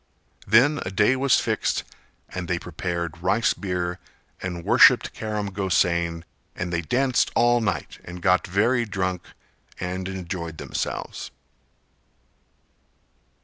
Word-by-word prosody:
Then 130 +8 +5
a - - -4
day 105 +6 +3
was 135 0 +3
fixed - - -1 0.5
and 90 -1 -5
they 85 - 0
prepared 85 -1 -4
rice 100 +6 +2
beer, 90 -2 -3 0.4
and 90 -2 -5
worshipped - - +6
Karam 105 -2 -3
Gosain 85 -3 +1 0.3
and 90 -1 -4
they 85 - 0
danced 125 - +1
all 120 +1 +4
night 95 -10 -3
and 90 +1 -8
got 90 +3 +2
very 115 +7 +2
drunk 95 -4 -2 0.6
and 90 +1 -3
enjoyed 85 -3 -5
themselves. - - -4
95 Hz, 115 wpm, -24 LUFS, 85-105 Hz, 0.6 s, worshipped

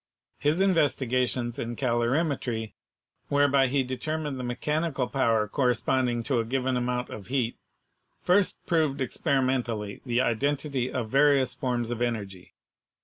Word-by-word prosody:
His 150 +4 +2
investigations 130 -9 +1
in 120 +1 -3
calorimetry, 120 -2 -1 0.6
whereby 140 -1 +4
he 135 +1 +1
determined 140 +2 -3
the - - -4
mechanical 140 +2 -1
power 115 -6 +1
corresponding 125 0 +1
to 130 -1 0
a - - +1
given 130 +2 -1
amount 125 0 -2
of 100 - -8
heat, 125 -3 -1 0.7
first 185 +2 +2
proved 155 -5 +1
expe 135 +2 0
rimentally 115 -6 -2
the 120 -2 0
identity 135 +1 0
of 115 -4 -3
various 135 -2 +4
forms 125 -3 -2
of 120 0 -4
energy. 100 -6 -4
130 Hz, 130 wpm, -27 LUFS, 120-140 Hz, 0.7 s, whereby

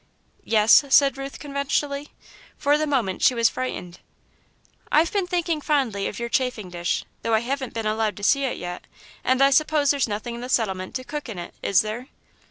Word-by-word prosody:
"Yes?" 220 +5 +6
said 275 -1 +5
Ruth, 275 0 -7
conventionally. 280 0 -2 0.5
For 290 0 +3
the 305 +1 0
moment 240 -10 -1
she 255 - +4
was 230 -1 +4
frightened. 180 -9 -5 0.9
"I've 320 +2 +4
been 395 -3 0
thinking 345 -3 -1
fondly 255 -10 0
of - - -6
your 235 - -3
chafing 250 -7 -1
dish, 175 0 -2 0.2
though 230 -1 +1
I 220 - +2
haven't 260 0 -4
been 225 -1 -3
allowed 215 0 0
to 205 - -9
see 275 +6 +3
it 260 - -2
yet, 175 0 -6 0.4
and 260 +1 +3
I 275 - +5
suppose 300 0 +3
there's 280 -3 +1
nothing 215 +3 -4
in 235 - -7
the 250 - -6
settlement 190 -7 -1
to 255 - -3
cook 295 0 -6
in 210 - -6
it, 175 - -7
is 200 +1 +3
there?" 220 +4 -5
255 Hz, 195 wpm, -24 LUFS, 215-280 Hz, 0.9 s, Yes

